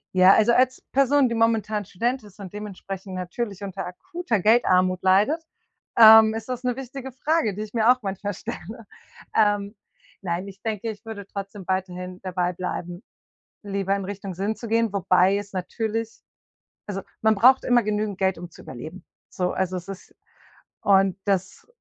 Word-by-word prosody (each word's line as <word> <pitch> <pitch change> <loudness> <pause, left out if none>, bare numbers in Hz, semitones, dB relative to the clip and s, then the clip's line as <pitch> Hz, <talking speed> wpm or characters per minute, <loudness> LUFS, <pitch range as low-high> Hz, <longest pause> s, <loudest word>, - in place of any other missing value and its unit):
Ja, 185 +1 +7
also 225 +2 +4
als 255 0 +2
Person, 275 0 +3
die 235 - -2
momentan 220 -2 +1
Student 240 +8 -2
ist 205 -1 -17
und 190 -3 -8
dementsprechend 195 -2 -7
natürlich 195 +3 -4
unter 195 -2 -5
akuter 335 - -3
Geldarmut 185 -4 +3
leidet, 210 - +3 0.5
ähm, 220 -1 +9
ist 225 +2 -6
das 250 0 -4
‘ne 250 -1 0
wichtige 265 0 -7
Frage, 265 - 0
die 210 - -6
ich 215 -1 -7
mir 225 +1 +5
auch 255 0 +1
manchmal 200 0 -4
stelle. 215 +5 -8 0.5
Ähm, 205 -1 +2 0.5
nein, 180 +1 -3
ich 195 0 -12
denke, 220 0 -3
ich 215 0 -8
würde 205 -3 -8
trotzdem 200 0 -7
weiterhin 180 -1 -3
dabei 180 -1 -1
bleiben, 175 0 -5 0.6
lieber 195 -1 -1
in 200 -1 -4
Richtung 195 -1 -6
Sinn 200 +5 -2
zu 230 - -8
gehen, 225 -2 +1
wobei 190 +1 +3
es 200 -1 -7
natürlich 225 +4 -3 0.7
also 195 -1 -4 0.2
man 220 0 +4
braucht 255 +6 +5
immer 245 -1 +4
genügend 210 -1 -2
Geld, 190 -2 +1
zu - - -15
überleben. 155 +9 -9 0.2
So, 180 -1 -2
also 185 0 -1
es 180 +1 -7
ist 195 -1 -10 0.7
und 195 -1 +4
das 190 -2 -2
205 Hz, 165 wpm, -24 LUFS, 190-225 Hz, 0.7 s, ähm